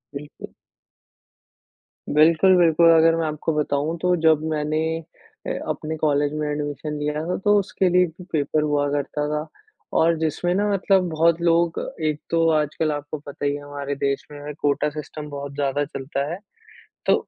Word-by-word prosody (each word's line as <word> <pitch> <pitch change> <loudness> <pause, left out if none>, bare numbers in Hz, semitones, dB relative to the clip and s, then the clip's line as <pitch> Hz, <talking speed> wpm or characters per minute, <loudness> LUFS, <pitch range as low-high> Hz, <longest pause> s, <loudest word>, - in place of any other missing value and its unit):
बिल्कुल। 145 +1 -9 1.5
बिल्कुल, 165 +5 +5
बिल्कुल 170 -1 +5
अगर 165 0 +5
मैं 165 -1 -1
आपको 155 +1 -2
बताऊँ 150 +2 -1
तो 180 0 +3
जब 160 -2 +5
मैंने 155 0 -1 0.7
अ, - - -1 0.2
अपने 155 0 -3
कॉलेज 145 -1 +1
में 150 0 -2
एडमिशन 145 0 -4
लिया 150 +1 -2
था 180 - -1
तो 205 0 +5
उसके 195 -1 0
लिए 180 +1 +4
भी 170 +2 -11
पेपर 150 0 +1
हुआ 145 -1 +1
करता 145 +1 -2
था 150 +1 -2 0.5
और 165 +1 +4
जिसमें 160 +3 0
ना 205 +2 +1
मतलब 190 -2 +2
बहुत 165 +1 +2
लोग 170 -1 +2 0.3
एक 155 -1 0
तो 165 0 +2
आज 150 -1 -2
कल 155 -1 +2
आपको 145 +1 -4
पता 145 0 -7
ही 145 - +1
है 145 - -7
हमारे 145 0 -5
देश 140 0 -1
में 145 0 -7
कोटा 145 +1 +1
सिस्टम 150 0 -7
बहुत 140 -1 -6
ज़्यादा 145 0 0
चलता 140 -1 -4
है। 175 - -5 0.7
तो - - +5
150 Hz, 170 wpm, -23 LUFS, 145-165 Hz, 1.5 s, बिल्कुल